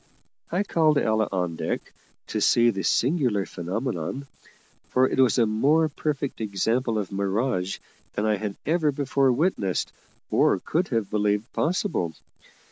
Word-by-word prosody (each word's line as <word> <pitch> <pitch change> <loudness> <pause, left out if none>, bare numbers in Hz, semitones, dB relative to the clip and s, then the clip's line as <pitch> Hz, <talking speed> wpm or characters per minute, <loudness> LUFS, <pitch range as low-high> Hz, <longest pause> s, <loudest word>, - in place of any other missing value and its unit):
I 180 +4 +1
called 160 -6 +2
Ella 110 -4 +1
on 90 -3 -1
deck - - -4 0.4
to - - -2
see 120 0 +4
the 95 - -4
singular 125 - +1
phenomenon, 100 - -4 0.6
for 130 +1 +3
it - - -2
was 130 -1 +4
a 120 - +4
more 145 +9 +2
perfect 140 -4 -3
example 110 +3 0
of 105 -3 -3
mirage 100 0 -1 0.4
than 105 - -1
I 105 -1 +2
had 100 -1 -4
ever 160 -2 +2
before 135 -1 +1
witnessed 125 - 0 0.4
or - - +4
could 175 +3 -1
have 115 -5 -1
believed 105 +1 0
possible. 155 - -1
115 Hz, 140 wpm, -25 LUFS, 100-140 Hz, 0.6 s, see